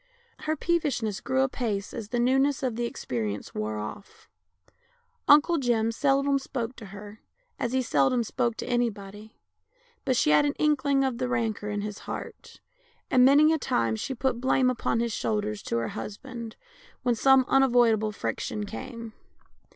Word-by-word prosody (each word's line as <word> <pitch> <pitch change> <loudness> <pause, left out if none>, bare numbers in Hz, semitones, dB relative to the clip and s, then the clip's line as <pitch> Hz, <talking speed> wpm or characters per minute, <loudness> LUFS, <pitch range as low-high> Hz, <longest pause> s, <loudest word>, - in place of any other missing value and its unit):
Her 310 - +1
peevishness 275 - -1
grew 260 +1 0
apace 230 -6 -2
as 215 -2 -6
the 245 - -2
newness 270 +3 +2
of 250 -4 -1
the 240 +1 -1
experience 110 - -4
wore 105 0 -3
of?. 105 - -8 1.0
Uncle 300 +3 +6
Jim 230 -3 +1
seldom 275 +2 +2
spoke 250 -2 -4
to 220 - -9
her, 205 +2 -11 0.4
as 240 -1 -2
he 260 0 +1
seldom 230 - +2
spoke 235 0 -1
to - - -4
any 240 -1 +1
body, 205 +1 -12 0.7
but 260 -3 +1
she 150 - +3
had 150 - +5
an 290 0 +1
inkling 285 -3 +2
of 260 -3 -1
the 255 -1 -1
rancour 225 -4 -1
in 205 -1 -2
his 210 0 -5
heart, - - -8 0.5
and 250 -1 +5
many 295 +4 +6
a 320 - 0
time 115 - 0
she 265 - -4
put 245 -1 -1
blame 260 0 +3
upon 230 -1 -1
his 235 -2 -1
shoul 215 0 0
ders 210 0 -4
to 115 - -2
her 115 - -1
husband, 230 +3 -7 0.5
when 245 -1 +2
some 265 +2 +5
unavoidable 240 -5 +3
friction 210 0 -3
came. 230 +1 -8
235 Hz, 165 wpm, -27 LUFS, 210-265 Hz, 1.0 s, Uncle